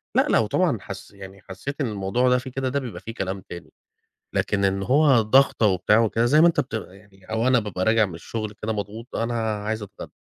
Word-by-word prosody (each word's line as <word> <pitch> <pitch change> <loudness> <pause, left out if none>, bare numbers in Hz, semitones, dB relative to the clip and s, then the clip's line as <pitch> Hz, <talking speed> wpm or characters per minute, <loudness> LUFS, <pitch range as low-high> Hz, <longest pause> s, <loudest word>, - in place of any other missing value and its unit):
لا - - +4
لو - - +3
طبعًا - - +1
حس - - -9
يعني 95 -1 -12
حسّيت 135 +11 -7
إن 130 - 0
الموضوع 105 +5 0
ده 125 - +4
في 130 +1 -6
كده، 130 0 -2
ده 140 +2 -1
بيبقى 125 -5 -7
فيه 115 - -7
كلام 95 -3 -4
تاني، 85 -1 -9 0.6
لكن 100 -1 0
إن 95 0 +1
هو 135 +2 +4
ضغطة 115 0 +4
وبتاع 100 +3 +3
وكذا، 115 +1 +1
زي 150 +5 +4
ما 170 - +7
أنت 170 - +3
بتغ 110 -7 -5
يعني 95 -1 -20
أو 110 +4 -1
أنا 125 -1 +4
بابقى 95 -4 -3
راجع 110 -1 +3
من 85 - -9
الشغل 110 +5 -5
كده 110 - -1
مضغوط، 110 +3 -6
أنا 115 +1 -1 0.3
عايز 110 0 -2
أتغدى، 100 -1 -10
110 Hz, 220 wpm, -24 LUFS, 100-125 Hz, 0.6 s, ما